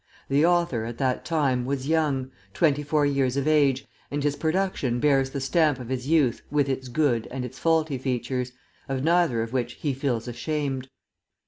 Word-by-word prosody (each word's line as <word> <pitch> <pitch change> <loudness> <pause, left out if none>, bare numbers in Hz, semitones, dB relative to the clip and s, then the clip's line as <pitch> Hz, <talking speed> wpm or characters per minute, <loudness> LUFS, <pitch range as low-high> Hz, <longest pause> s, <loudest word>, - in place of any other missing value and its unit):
The 140 +2 +3
author, 170 -9 +2
at 115 0 -6
that 130 -2 0
time, 140 -7 +1
was 135 +1 -3
young, 145 -5 +1 0.2
twenty 150 -3 +3
four 150 0 +1
years 135 -2 +1
of 140 +1 0
age, 140 -3 +3 0.2
and 145 0 -2
his 145 -1 +1
production 160 -6 0
bears 135 -1 +3
the 140 - -4
stamp 150 0 +2
of 125 -2 -8
his 130 0 -3
youth 145 -7 +2
with 145 -2 +2
its 130 -1 -2
good 125 -4 +1
and 130 0 -4
its 125 +1 -9
faulty 160 -4 +1
features, 125 0 -2 0.4
of 135 -1 -1
neither 165 -8 +3
of 115 +2 -7
which 125 -2 -1
he 145 -3 -2
feels 130 -3 -2
ashamed. 135 +1 -3
135 Hz, 185 wpm, -25 LUFS, 130-150 Hz, 0.4 s, The